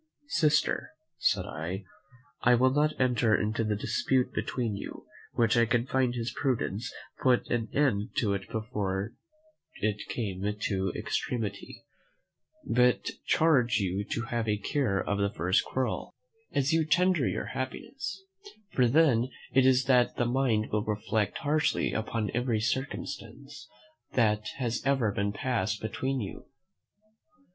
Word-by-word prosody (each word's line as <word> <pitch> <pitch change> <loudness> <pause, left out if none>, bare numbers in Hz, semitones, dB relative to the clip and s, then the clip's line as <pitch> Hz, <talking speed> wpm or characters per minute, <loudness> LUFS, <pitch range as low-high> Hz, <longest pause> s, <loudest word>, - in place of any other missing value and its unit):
"Sister," 155 - +2 0.3
said - - +2
I, 90 +5 -5 0.6
"I 125 0 +5
will 130 +2 +4
not 150 +2 +1
enter 125 -4 +3
into 110 +2 0
the 105 -1 0
dispute 130 +5 0
between 115 -5 -2
you, 100 - -7 0.3
which 115 0 +3
I 115 -1 +4
find 125 +1 +1
his 115 0 -3
prudence 125 -2 -1 0.3
put 125 -2 +3
an 115 -2 0
end 115 -8 +1
to 100 -4 +1
before 105 -2 -3 0.6
it 105 0 -2
came 100 -6 -3 0.2
to 95 -3 0
extremity; 105 -5 -3 0.8
but 125 - +3 0.2
charge 130 -8 +4
you 100 -1 -1
to 115 - -3
have 115 -1 -2
a 105 -1 +1
care 105 -1 0
of 100 +1 -1
the 100 0 +2
first 90 +1 +1
quarrel, 130 0 -2 0.4
as 140 +3 +1
you 165 0 +4
tender 170 -1 +3
your - - -2
happiness; 270 - -5 0.5
for 125 -2 +4
then 130 -3 +4 0.2
it 130 0 +5
is 130 0 +5
that 125 -2 +3
the 120 - +1
mind 120 -3 +1
will 105 0 +1
reflect 105 -1 -1
harshly 150 +1 +1
upon 110 -1 -2
every 120 -2 +1
circumstance 130 +5 -4 0.4
that 105 -3 +2
has 120 -3 -1
ever 135 -7 +2 0.2
passed 110 -3 -1
between 130 +5 -2
you. 100 -5 -6
120 Hz, 135 wpm, -29 LUFS, 105-130 Hz, 0.8 s, I